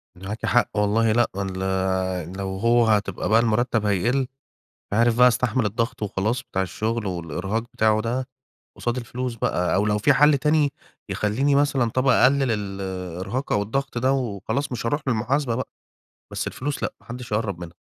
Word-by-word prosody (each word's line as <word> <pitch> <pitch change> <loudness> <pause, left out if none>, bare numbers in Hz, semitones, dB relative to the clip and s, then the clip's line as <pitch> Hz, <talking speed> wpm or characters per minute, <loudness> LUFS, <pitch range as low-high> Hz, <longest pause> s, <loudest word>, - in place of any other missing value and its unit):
معاكِ 100 +5 -6
حق، 115 +1 +3
والله 110 +2 +2
لأ، 120 +1 +3
وال 95 0 -3 0.8
لو 95 -1 -3
هو 115 +3 +3
هتبقى 105 -4 0
بقى 110 +1 +5
المرتّب 115 -1 +1
هيقِل 105 +6 +1 0.7
مش - - -3
عارف 115 +1 +3
بقى 125 0 +8
هاستحمل 125 0 +1
الضغط 115 +4 -2
وخلاص 105 +5 -1
بتاع 95 - -2
الشُغل 110 +4 -2
والإرهاق 90 +4 -3
بتاعه 110 0 +3
ده 125 +3 -2 0.5
قصاد 120 +1 -2
الفلوس 125 0 -4
بقى، 90 -5 0
أو 100 - +2
لو 105 0 +2
في 105 - +4
حَل 150 -1 +5
تاني 150 0 +2 0.4
يخلّيني 130 +7 +1
مثلًا 140 -4 +2
طَب 130 +4 0
أقلل 130 0 +4
الإرهاق 95 +2 -4
أو 105 - +2
الضغط 135 +5 -2
ده 130 +2 +2
وخلاص 125 +2 -2
مش 120 -2 -4
هاروح 145 +6 0
للمحاسبة 125 +1 0
بقى، 130 - -3 0.6
بس - - -3
الفلوس 145 +2 -4
لأ - - -2
ما - - -23
حدش 120 0 -8
يقرّب 105 -4 -1
منها. 85 -1 -8
115 Hz, 170 wpm, -24 LUFS, 105-125 Hz, 0.8 s, بقى